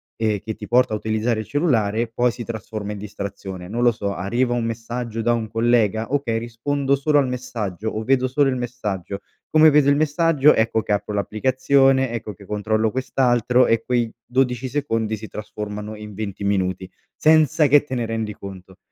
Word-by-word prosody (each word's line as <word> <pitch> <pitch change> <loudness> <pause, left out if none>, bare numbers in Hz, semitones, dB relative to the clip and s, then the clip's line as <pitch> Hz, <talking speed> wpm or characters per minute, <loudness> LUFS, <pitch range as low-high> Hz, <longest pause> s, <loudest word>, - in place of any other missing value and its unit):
ehm, 110 -2 0
che 110 +1 -5
ti - - -9
porta 125 -1 +3
a - - +1
utilizzare 110 +1 -1
il 110 - -6
cellulare 115 -7 +1
poi 120 +2 +1
si 120 - -7
trasforma 110 -2 -6
in 105 - -6
distrazione. 100 -3 -7
Non 115 +5 -3
lo 120 0 +5
so, 100 -3 -3
arriva 120 +7 0
un 120 -1 -1
messaggio 115 0 -4
da 120 +1 +3
un 110 -2 -2
collega? 115 0 +1
"Okay, 130 -6 0
rispondo 135 +5 -1
solo 145 +2 +2
al 140 -2 +3
messaggio." 110 -5 -4
O: 110 0 -4
"Vedo 130 +2 +2
solo 135 +2 +2
il 130 - -2
messaggio." 105 -6 -4 0.3
Come 155 0 +6
vedo 145 -1 +4
il 145 - +5
messaggio 150 -1 +3
ecco 110 0 +1
che - - -4
apro 105 +1 -1
l'applicazione, 130 +5 +2
ecco 110 -3 -5
che 105 - -16
controllo 110 +2 0
quest'altro 125 -1 +2
e 115 -1 +2
quei 120 -1 -1
12 125 0 0
secondi 115 -6 -1
si 110 0 -9
trasformano 105 0 -6
in 105 0 -9
20 100 -1 -5
minuti, 95 -2 -1 0.3
senza 155 -1 +4
che 145 +1 +6
te 130 - -4
ne 120 - -1
rendi 110 -2 -3
conto. 95 -1 -11
115 Hz, 185 wpm, -22 LUFS, 105-130 Hz, 0.3 s, Come